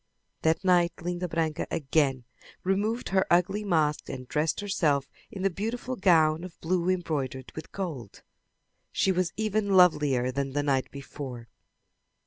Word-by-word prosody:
That 160 +3 +1
night 175 -2 +4
Linda 175 +1 -2
Branca 160 -1 -1
again 135 -3 +1 0.4
removed 210 +5 0
her 190 -1 +2
ugly 185 +4 +3
mask 155 -6 +1
and 130 -1 -6
dressed 150 +3 0
herself 160 -9 +1 0.2
in 190 - -6
the 195 - +2
beautiful 235 +7 -3
gown 165 -5 +4
of 180 -2 -10
blue 175 +1 0
embroidered 145 -8 -2
in 155 - -5
gold. 150 - -6 0.7
She 190 - +2
was 180 -2 0
even 215 -1 0
lovelier 145 -8 +4
than 135 +1 -3
the 145 0 0
night 135 -2 +1
before. 135 -4 -8
165 Hz, 140 wpm, -28 LUFS, 140-190 Hz, 0.7 s, night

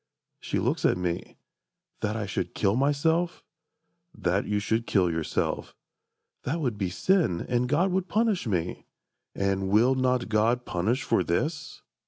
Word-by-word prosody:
She - - -3
looks - - 0
at - - +3
me. 90 -1 -3 0.6
"That 105 +1 -1
I 110 -2 -2
should 100 - -3
kill 100 0 +2
myself?"— 160 +6 +1 0.7
"That 95 +3 0
you 105 - 0
should 110 +3 -1
kill 90 -4 +2
yourself."—"That 85 - -5
would 125 -8 -1
be 95 -3 -2
sin, 155 - +1
And 125 0 0
God 170 +7 +2
would 190 0 0
punish 215 - +1
me!"—"And 95 +1 -3
will 115 +6 +4
not 130 -1 +1
God 115 +3 +1
Punish 110 +10 0
for - - +2
this?" 150 - -2
115 Hz, 140 wpm, -27 LUFS, 95-145 Hz, 0.7 s, will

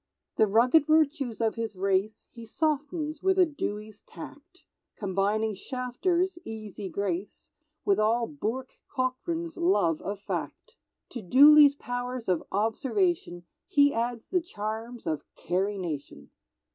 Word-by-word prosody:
The 220 - +5
rugged 245 +9 +4
virtues 300 -6 +2
of 225 -1 +2
his 225 -3 -4
race 195 +2 -1
He 235 - -11
softens 305 +4 -2
with 380 0 +2
a 370 - +6
Dewey's 215 -8 -5
tact, 295 - -12 0.3
Combining 205 +2 0
Shafter's 280 - -1
easy 215 -3 -7
grace 190 +1 -4 0.3
With 200 0 +3
all 230 +2 +2
Bourke 260 -1 -5
Cockran's 325 +6 -3
love 340 - +2
of 200 0 -4
fact; 200 - -5 0.3
To 240 - -6
Dooley's 285 +7 +7
pow'rs 245 -2 -5
of 180 -3 +1
observation 225 - 0 0.2
He 285 0 +4
adds 235 0 -2
the 365 -1 +2
charms 225 -4 -6
of 155 -3 -1
Carrie 195 +4 -1
Nation. 145 - -6
230 Hz, 125 wpm, -28 LUFS, 205-295 Hz, 0.3 s, Dooley's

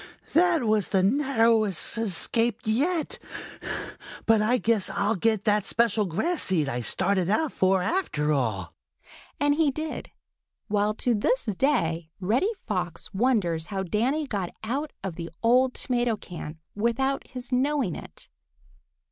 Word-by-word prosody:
"That 340 -3 +4
was 215 -3 +1
the 190 -2 +2
narrowest 225 - +3
escape 225 +2 +1
yet! 300 +10 0 1.1
But 225 -1 +4
I 235 +4 +3
guess 225 -4 +1
I'll 200 +2 0
get 220 +1 +1
that 210 -1 +2
special 220 -2 +1
grass 330 - 0
seed 165 -6 +3
I 125 -2 -2
started 185 - +1
out 310 +8 +1
for, 190 -1 +2
after 155 - 0
all." 110 - -2 0.7
And 290 0 +3
he 305 0 +2
did, 310 +3 -5 0.6
while 210 0 +1
to 245 +1 0
this 365 - +1
day 185 - 0
Reddy 225 - +1 0.2
Fox 180 -4 -4
wonders 190 -8 +1
how 195 -2 -3
Danny 245 - 0
got 200 -9 -3
out 275 +7 -2
of 190 -4 -5
the 170 -1 -5
old 250 +2 +4
tomato 240 -3 0
can 165 -5 -8 0.2
without 240 +6 -1
him 255 -1 -8
knowing 260 - +1
it. - - -11
220 Hz, 140 wpm, -26 LUFS, 190-260 Hz, 1.1 s, That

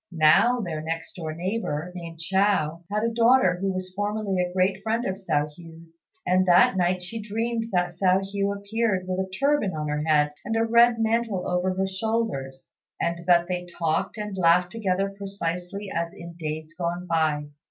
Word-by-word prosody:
Now 175 +10 +4
their 165 -6 -4
next 165 +1 -4
door 160 -4 -5
neighbour, 180 -3 -3
named 170 -2 -8
Chao, 170 -2 +1
had 210 +1 0
a 230 0 0
daughter 230 -6 +4
who 195 0 0
was 185 0 -5
formerly 205 -1 -1
a 180 0 -2
great 190 +1 +1
friend 225 +3 -1
of 190 - 0
Hsiao 160 -6 -1
hui's, 165 0 -14 0.2
and 185 +1 +3
that 175 +2 +6
night 180 0 +1
she 220 +5 -5
dreamt 225 +2 -2
that 180 -1 +1
Hsiao 185 +2 +2
hui 200 0 0
appeared 200 -2 -1
with 185 0 -2
a 190 0 -2
turban 265 - +1
on 150 -1 -3
her 150 0 -1
head 150 -2 +3
and 225 - -2
a 225 0 +2
red 235 +1 +5
mantle 225 -3 0
over 180 +1 0
her 190 +1 0
shoulders, 190 -10 -3 0.3
and 170 0 -1
that 175 -1 +5
they 180 -1 -3
talked 170 +3 -1
and 210 -2 -4
laughed 175 0 +4
together 195 -3 0
precisely 195 0 -4
as 170 0 -2
in 170 0 -9
days 155 -1 -5
gone 175 0 -3
by. 155 -3 0
185 Hz, 185 wpm, -25 LUFS, 170-205 Hz, 0.3 s, that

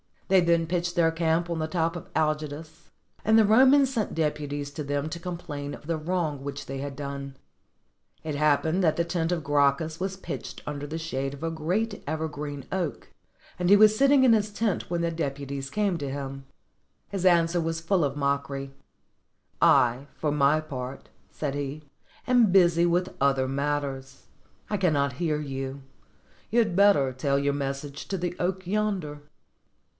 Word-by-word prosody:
They 190 0 +6
then 170 -1 +3
pitched 175 +1 -2
their 165 -1 +3
camp 165 +1 0
on 170 -1 -2
the 155 - -1
top 165 0 -1
of 175 - -7
Algidus; 155 +1 -2 0.3
and 220 +1 +4
the 220 - +6
Romans 265 +5 +5
sent 220 -4 -2
deputies 145 -2 -2
to 150 +1 -5
them 145 +1 -2
to 170 - -6
complain 165 -5 -5
of - - -15
the 165 +1 -1
wrong 155 -3 -2
which 140 0 -5
they 135 - -5
had 140 0 -5
done. 140 -1 -6 0.9
It 155 -1 -3
happened 150 +4 +2
that 160 -4 +3
the 170 - +1
tent 170 0 -1
of 165 -3 -3
Gracchus 145 +2 +1
was 190 +1 -2
pitched 190 - -7
under 145 -1 -5
the 160 +2 -4
shade 135 -4 -3
of 140 - -11
a 165 - -1
great 185 +8 -2
ever 160 +1 -2
green 145 -2 -6
oak, 180 -5 -3 0.5
and 180 0 +1
he 200 - +9
was 215 +1 +6
sitting 275 +2 +5
in 255 - +6
his 210 -1 +1
tent 210 -1 -1
when 170 -1 -1
the 170 0 0
depu 140 -4 -4
ties 135 -1 -4
came 200 0 0
to 140 -3 -4
him. 135 0 -6 0.6
His 195 -2 -3
answer 170 -1 +4
was 165 0 -2
full 170 -1 +2
of 140 0 -2
mockery: 140 -1 -2 0.9
"I, 125 +3 +4
for 150 - -1
my 150 +1 +3
part," 130 -3 -7 0.2
said 145 -3 -4
he, 145 +1 -4 0.4
"am 245 -5 +4
busy 175 -3 +5
with 175 +2 +1
other 135 -1 +2
matters: 135 -1 -3 0.5
I 210 - 0
cannot 145 -8 +1
hear 155 -4 0
you; 135 -1 -5 0.7
you 230 - -1
had 220 -7 +3
better 195 -9 +5
tell 140 +2 0
your 140 0 +1
message 140 +1 -4
to 195 - -2
the 175 0 -3
oak 185 +1 -1
yonder." 185 -7 -2
160 Hz, 180 wpm, -27 LUFS, 140-180 Hz, 0.9 s, he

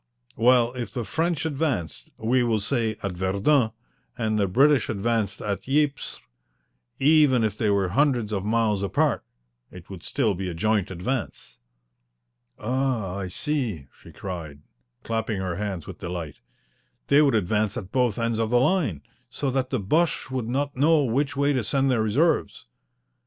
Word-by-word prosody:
"Well, 120 +1 +4
if 125 -2 -5
the 120 - -3
French 165 +2 -1
advanced, 140 - -2
we 125 +3 +1
will 115 -3 +1
say, 110 0 -1
at 100 - -1
Verdun, 100 +8 +2 0.5
and 110 -2 0
the 100 - +2
British 135 +7 +3
advanced 110 -1 -1
at 105 +4 -4
Ypres, 145 0 0 0.8
even 145 -4 +4
if 105 -2 0
they 105 -1 0
were 100 -2 +2
hundreds 125 -2 +1
of 95 -2 -1
miles 110 -2 +1
apart 100 - +1 0.5
it 90 +1 -13
would 95 -3 -8
still 105 +4 0
be 95 0 -4
a 85 - -5
joint 105 +2 +1
advance." 95 - -4 1.0
"Ah, 120 -5 -1
I 100 -2 -4
see," 110 - -3
she - - -13
cried, 80 -6 -7 0.4
clapping 110 -2 -2
her 90 -2 -3
hands 100 -5 -4
with - - -9
delight. 85 -4 -5 0.7
"They 140 +1 +5
would 140 -5 +3
advance 105 +1 0
at 95 -1 -7
both 125 -5 +1
ends 115 -1 -1
of 110 -1 0
the 120 +1 +4
line, 130 - +1 0.3
so 140 -2 -2
that 130 -1 -1
the 130 - -1
Boches 155 - 0
would 125 -3 -3
not 140 +3 -1
know 150 +3 +4
which 140 +4 0
way 140 +1 +2
to 130 -4 0
send 135 +4 +1
their 120 -3 +2
reserves." 140 +11 +1
115 Hz, 160 wpm, -25 LUFS, 100-135 Hz, 1.0 s, They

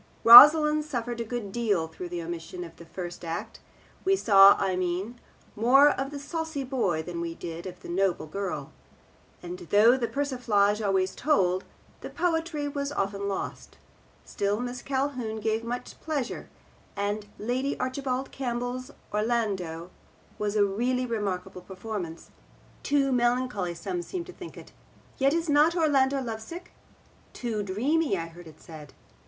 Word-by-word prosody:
Rosalind 300 +5 +10
suffered 240 -5 -4
a - - -1
good 225 -3 -5
deal 205 -8 0
through 175 +2 -8
the 175 -1 -4
omission 170 +1 -6
of 165 -1 -11
the 170 - -13
first 175 0 -7
act; 165 0 -5 0.4
we 390 +1 +3
saw, 200 - +7
I 190 -2 0
mean, 185 +6 -3 0.4
more 270 +6 +6
of 270 0 -3
the 290 - -7
saucy 320 0 -4
boy 230 - -1
than 170 0 -5
we 165 -1 -4
did 170 +1 -7
of 180 -1 -10
the - - -9
noble 185 0 0
girl; 190 +4 -5 0.7
and 355 +1 -7
though 220 +4 +6
the 240 -3 -1
persiflage 225 -5 +1
always 190 -2 +1
told, 185 - +1 0.3
the - - -8
poetry 325 -4 -1
was 280 0 -3
often 200 -4 -2
lost; 195 -1 -5 0.5
still 205 +1 -1
Miss 245 0 -5
Calhoun 260 -5 -2
gave 220 +1 -1
much 245 +2 -6
pleasure; 290 -6 -4 0.5
and 205 +1 -2
Lady 255 +5 -2
Archibald 260 0 -3
Campbell's 250 0 -4 0.2
Orlando 200 -7 -1 0.5
was 210 0 -2
a 205 -1 +4
really 245 +6 -1
remarkable 195 -6 -3
performance. 185 -4 -7 0.5
Too 280 -1 +1
melancholy 240 -7 0
some 180 0 -4
seemed 345 - -5
to 365 - -11
think 355 - -10
it. - - -12 0.5
Yet 275 +3 +3
is 335 0 -1
not 300 +3 +4
Orlando 275 -4 +2
lovesick? 235 +10 -7 0.6
Too 230 -4 -3
dreamy, 245 +7 0
I 165 -1 -5
heard 170 +1 -13
it 155 -1 -15
said. 155 -3 -12
225 Hz, 150 wpm, -27 LUFS, 190-270 Hz, 0.7 s, Rosalind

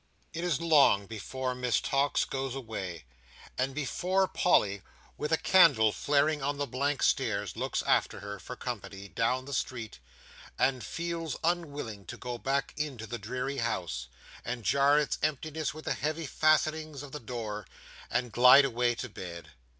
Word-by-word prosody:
It 170 - -4
is 175 -5 +1
long 150 -11 +5
before 125 +5 -4
Miss 125 -5 +1
Tox 140 +1 +1
goes 135 -1 -3
away, 95 - -6 0.5
and 130 +1 -1
before 180 +7 +1
Polly, 100 - +2 0.3
with 150 - -3
a 160 - +4
candle 145 - +5
flaring 150 +5 +1
on 145 +1 -1
the 145 - -1
blank 140 +3 -1
stairs, - - +1
looks - - -2
after - - +1
her, 100 0 -6
for 125 - -8
company, 100 -5 -6
down 125 +4 0
the 140 - -7
street, 120 - -3 0.6
and 130 -2 +1
feels 165 -1 -3
unwilling 145 - -2
to - - -8
go 120 -1 -5
back 135 +2 -1
into 140 -7 -4
the 120 +2 -5
dreary 125 +6 -3
house, 85 - -2 0.4
and 125 -2 -4
jar 140 +5 +4
its 150 -1 0
emptiness 155 +1 -1
with 155 +1 -11
the - - +1
heavy 155 +3 -2
fastenings 155 -1 +1
of 140 - -10
the 150 - -5
door, 110 -5 -5 0.4
and 120 -1 -1
glide 125 +5 +8
away 120 -2 +1
to 130 - -5
bed. 85 -6 -8
130 Hz, 160 wpm, -30 LUFS, 115-150 Hz, 0.6 s, glide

